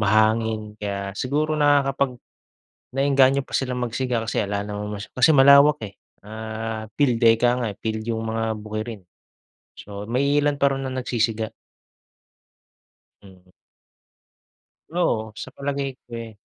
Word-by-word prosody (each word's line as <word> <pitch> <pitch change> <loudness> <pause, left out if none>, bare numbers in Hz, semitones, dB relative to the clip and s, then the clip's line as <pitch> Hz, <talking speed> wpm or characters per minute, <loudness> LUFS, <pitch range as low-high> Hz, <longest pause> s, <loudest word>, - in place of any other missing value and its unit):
Mahangin, 110 +1 +2
kaya 100 -1 -3
siguro 145 +8 -1
nakakapag 140 -3 +2 0.8
naengganyo 135 0 +3
pa 135 - -3
silang 125 -2 -2
magsiga 125 0 -1
kasi - - -2
'ala 100 0 -2
naman 105 0 -5
mas 105 - -8
kasi 130 +5 +5
malawak 140 +1 +7
eh. 100 - -20 0.2
Ah, 110 +1 -5 0.2
field 130 -5 +4
eh, 115 - +8
'ika 125 0 +2
nga. - - -1
Field 110 -1 -3
yung 115 -1 -3
mga 115 0 -1
bukirin. 110 -2 -6 0.7
So, 100 0 -8
may 135 +6 +1
iilan 145 -1 +1
pa 140 - +4
raw - - -3
na 130 - -4
nagsisiga. 115 -3 -1 1.8
Mm. 95 -2 -18 1.4
Oo, 135 -11 0
sa - - -7
palagay 140 -1 -3
ko - - -66
eh 115 -1 -8
115 Hz, 135 wpm, -23 LUFS, 110-135 Hz, 1.8 s, eh